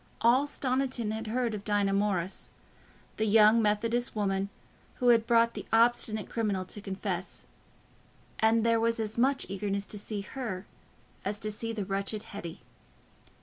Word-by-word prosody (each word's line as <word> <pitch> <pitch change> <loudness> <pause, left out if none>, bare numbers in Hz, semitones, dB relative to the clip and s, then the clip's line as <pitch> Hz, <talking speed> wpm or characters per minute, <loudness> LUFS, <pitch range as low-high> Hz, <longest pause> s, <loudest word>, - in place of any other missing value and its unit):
All 255 +5 +4
Stoniton 255 -5 -1
had 220 0 -4
heard 235 0 0
of 205 -1 -5
Dinah 205 -2 +1
Morris, 195 -3 -1 0.7
the 220 - +1
young 215 +2 +6
Methodist 230 +3 0
woman 195 -1 0 0.5
who 250 -2 +2
had 230 -1 +5
brought 230 -1 +4
the - - -7
obstinate 225 -2 +3
criminal 205 -5 -1
to 205 - -8
confess, 190 -2 -4 0.9
and 225 +1 +3
there 230 0 +4
was 230 0 +1
as 220 -1 -2
much 270 +3 +2
eagerness 200 +1 -2
to 210 - -7
see 205 0 -4
her 210 -4 -5 0.6
as 205 +2 -2
to 215 0 -3
see 230 +2 -3
the 210 -3 -3
wretched 200 +2 -2
Hetty. 200 -7 -8
215 Hz, 150 wpm, -30 LUFS, 200-230 Hz, 0.9 s, young